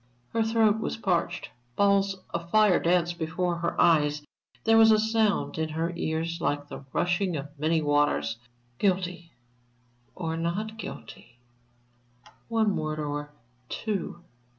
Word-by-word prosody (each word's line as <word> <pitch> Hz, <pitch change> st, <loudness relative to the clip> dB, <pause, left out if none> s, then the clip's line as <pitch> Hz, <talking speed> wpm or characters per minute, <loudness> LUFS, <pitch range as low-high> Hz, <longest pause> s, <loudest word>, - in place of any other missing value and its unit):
Her 230 Hz, -, 0 dB
throat 220 Hz, -1 st, +3 dB
was -, -, -3 dB
parched, 185 Hz, -6 st, -1 dB, 0.2 s
balls 200 Hz, -1 st, +2 dB
of 170 Hz, 0 st, -4 dB
fire 210 Hz, -2 st, +5 dB
danced 175 Hz, 0 st, +1 dB
before 175 Hz, +2 st, -1 dB
her 170 Hz, 0 st, -2 dB
eyes, 150 Hz, -2 st, +3 dB, 0.4 s
there 225 Hz, 0 st, +4 dB
was 225 Hz, 0 st, +8 dB
a 215 Hz, -, +6 dB
sound 220 Hz, -5 st, +1 dB
in 160 Hz, 0 st, -1 dB
her 165 Hz, +2 st, -2 dB
ears 165 Hz, +1 st, -2 dB
like 145 Hz, 0 st, -1 dB
the -, -, -8 dB
rushing 175 Hz, -1 st, 0 dB
of 145 Hz, +1 st, -6 dB
many 160 Hz, +1 st, +1 dB
waters. 145 Hz, -6 st, +1 dB, 0.4 s
Guilty 180 Hz, -3 st, -1 dB, 0.8 s
or 165 Hz, -2 st, -3 dB
not 200 Hz, +7 st, -2 dB
guilty? 120 Hz, -, -9 dB, 1.1 s
One 220 Hz, -3 st, +1 dB
word 155 Hz, 0 st, -2 dB
or 145 Hz, -1 st, -3 dB, 0.4 s
two? 195 Hz, -5 st, -4 dB
175 Hz, 130 wpm, -27 LUFS, 160-205 Hz, 1.1 s, was